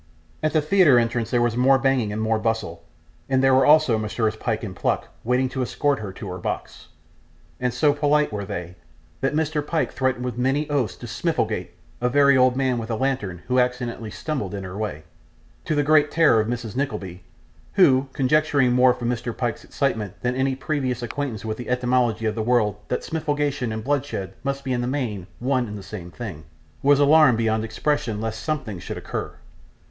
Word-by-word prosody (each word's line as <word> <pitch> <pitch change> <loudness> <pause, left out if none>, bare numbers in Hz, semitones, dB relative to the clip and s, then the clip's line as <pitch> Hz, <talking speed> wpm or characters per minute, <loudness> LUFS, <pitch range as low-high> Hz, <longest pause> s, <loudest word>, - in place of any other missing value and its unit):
At 155 -1 0
the 155 -2 +2
theatre 155 -5 +5
entrance 115 -1 0
there 120 -1 +2
was 120 -1 0
more 130 +2 +5
banging 130 -5 +1
and 105 - -3
more 110 0 +1
bustle, 110 -7 -2 0.5
and 130 0 +2
there 135 0 +5
were 130 - +5
also 150 -7 +5
Messrs 110 +1 -1
Pyke 110 0 -2
and 95 -4 -6
Pluck - - -1
waiting 125 +2 +1
to 130 0 -3
escort 140 +2 0
her 105 -2 -5
to 100 - -8
her 90 - -6
box; - - -5 0.7
and 125 -1 0
so 145 +4 +3
polite 145 0 +2
were 105 -1 -3
they, 90 -3 -5 0.5
that 135 +2 0
Mr. 155 -1 0
Pyke 160 +1 -1
threatened 130 -1 -1
with 125 -1 -4
many 135 +4 +1
oaths 135 -6 0
to - - -10
'smifligate' - - -2 0.3
a 125 - +2
very 140 +1 +5
old 130 -1 +4
man 130 -2 +1
with 115 0 -6
a 115 - 0
lantern 105 -9 -2
who 125 0 +2
accidentally 125 -3 -1
stumbled 105 -4 -4
in 100 - -5
her 95 0 -7
way 105 -7 -4 0.6
to 155 - 0
the 145 - +2
great 150 0 +4
terror 160 -9 +4
of 110 - -3
Mrs. 120 -2 -4
Nickleby, 95 -10 -3 0.5
who, 135 -7 +4
conjecturing 140 -1 +2
more 125 0 +5
from 120 -2 -4
Mr. 120 -1 -3
Pyke's 120 -3 -2
excitement 110 -9 -2
than 125 0 +1
any 130 0 +1
previous 130 -3 -2
acquaintance 120 -2 -4
with 110 0 -3
the 120 - -7
etymology 125 -2 +1
of 110 - +1
the 110 - -3
word 110 -2 +2
that 125 - -1
smifligation 145 -5 -1
and 110 0 -4
bloodshed 140 -7 -2
must 140 0 -2
be 130 -2 -1
in 120 - 0
the 120 - -2
main 115 -9 -3
one 125 -1 0
and 105 0 -6
the 100 - -9
same 90 -2 -8
thing, 90 -7 -8 0.4
was 140 0 +4
alarmed 145 -4 +6
beyond 110 -1 +1
expression, 110 -1 -1
lest 110 0 -4
something 130 - -3
should - - -6
occur. - - -4
125 Hz, 200 wpm, -23 LUFS, 110-140 Hz, 0.7 s, alarmed